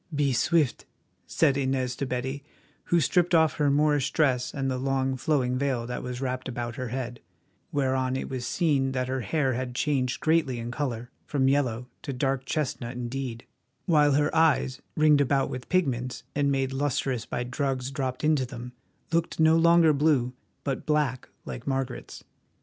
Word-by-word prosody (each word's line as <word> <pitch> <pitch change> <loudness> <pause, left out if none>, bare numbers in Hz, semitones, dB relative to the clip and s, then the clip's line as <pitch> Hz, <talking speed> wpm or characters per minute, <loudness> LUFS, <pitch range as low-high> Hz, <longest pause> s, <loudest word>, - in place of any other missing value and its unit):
"Be 140 -2 +2
swift," 155 +1 +1 0.4
said 140 -4 +2
Inez 130 -2 0
to 140 - -2
Betty, 130 +3 -3 0.4
who 170 - +3
stripped 175 +3 +2
off 160 -1 +3
her 145 -2 +3
Moorish 145 -1 +2
dress 125 -5 +2
and 135 -2 -2
the 130 -1 -1
long, 135 0 0
flowing 130 -2 0
veil 130 -4 0
that 125 +1 -4
was 125 0 -5
wrapped 130 -1 -3
about 120 -1 -4
her 130 -2 -4
head, 120 0 -4 0.5
whereon 130 -2 0
it 130 - -3
was 125 -2 -4
seen 140 -6 +1
that 130 -1 -1
her 130 0 -2
hair 135 +4 0
had 125 0 -4
changed 130 -2 0
greatly 155 -6 +2
in 115 +1 -5
colour, 125 -3 -3 0.2
from 135 -3 +1
yellow 125 -3 +1
to 140 - -5
dark 135 0 -1
chestnut 130 -4 -2
indeed, 125 -1 -4 0.4
while 150 -5 +4
her 145 +3 +1
eyes, 155 -5 +2 0.2
ringed 150 -2 +5
about 140 0 +1
with 125 -1 -6
pigments, 130 -9 0
and 140 0 +1
made 135 -1 0
lustrous 135 -3 -1
by 125 - -2
drugs 130 0 -2
dropped 130 -2 -3
into 150 -3 +3
them, 125 0 -8 0.4
looked 165 0 0
no 160 0 +6
longer 165 -1 +5
blue, 140 -4 +2 0.3
but 135 -2 -3
black 150 -5 0 0.2
like 120 - -7
Margaret's. 135 -2 -3
135 Hz, 170 wpm, -27 LUFS, 125-145 Hz, 0.5 s, no